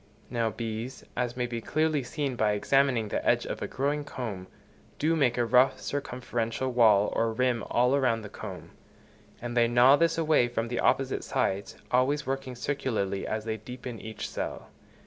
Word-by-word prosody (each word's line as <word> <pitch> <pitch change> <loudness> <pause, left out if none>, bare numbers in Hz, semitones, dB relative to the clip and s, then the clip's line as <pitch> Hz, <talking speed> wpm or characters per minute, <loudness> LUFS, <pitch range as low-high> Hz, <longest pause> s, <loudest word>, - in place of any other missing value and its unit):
Now 115 -2 +1
bees, 115 +2 -5
as 120 0 -2
may 125 - 0
be 120 -1 -4
clearly 155 +2 +1
seen 135 +1 -3
by 110 -3 +2
examining 125 +1 +2
the - - -2
edge - - +2
of - - -5
a - - -2
growing 145 +2 -1
comb, 110 -10 -6 0.5
do 160 +2 +2
make 130 -6 +2
a 120 - +2
rough, 125 +3 +4
circumferential 125 -2 -3
wall 110 -4 +4
or 115 0 +1
rim 120 0 0
all 125 +3 +3
round 115 -4 +1
the - - -6
comb; - - -8 0.7
and 120 0 -4
they 120 -1 +4
gnaw 125 +4 +6
this 165 0 +2
away 155 -6 +3
from 115 -1 -2
the 120 - -2
opposite 135 -1 +1
sides, 95 +1 -1 0.2
always 135 +4 +2
working 130 -1 -3
circularly 110 -7 -2
as 110 0 -3
they 110 -1 -2
deepen 125 +1 -8
each 110 0 -6
cell. - - -5
125 Hz, 175 wpm, -28 LUFS, 115-135 Hz, 0.7 s, gnaw